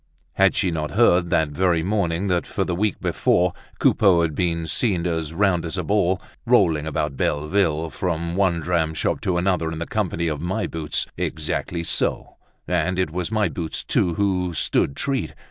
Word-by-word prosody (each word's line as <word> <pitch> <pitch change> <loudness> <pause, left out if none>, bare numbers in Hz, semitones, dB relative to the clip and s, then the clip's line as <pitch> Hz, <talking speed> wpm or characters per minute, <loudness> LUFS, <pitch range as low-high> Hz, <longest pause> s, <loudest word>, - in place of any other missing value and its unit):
Had 95 0 +3
she 95 -3 +1
not 75 -2 -2
heard 90 -7 +4
that 80 -2 +2
very 85 +1 +1
morning 95 -2 0
that 90 -3 0
for - - -1
the 90 - -2
week 100 +2 0
before 90 0 +1 0.2
Coupeau 90 -5 +4
had 80 -2 -1
been 85 0 -1
seen 90 0 0
as 80 -3 -2
round 90 -1 +1
as 85 +2 -4
a 90 - -1
ball, 95 -1 +1 0.2
rolling 90 -11 +3
about 75 -2 -2
Belleville 80 +2 0
from 85 -1 -2
one 90 -4 +1
dram 80 -1 0
shop - - -1
to 90 -2 0
another 90 -3 0
in 80 - -5
the 85 - -3
company 85 -5 -1
of 75 -2 -2
My 90 +3 -1
Boots. 80 -2 -2
Exactly 85 -1 -2
so; - - -1 0.3
and 90 +1 0
it 90 -4 0
was 90 +3 -3
My 110 -2 +2
Boots, 80 -1 -3
too, 85 -2 +1
who 90 -3 0
stood 70 - +1
treat. 135 -2 -2
85 Hz, 180 wpm, -22 LUFS, 80-95 Hz, 0.3 s, heard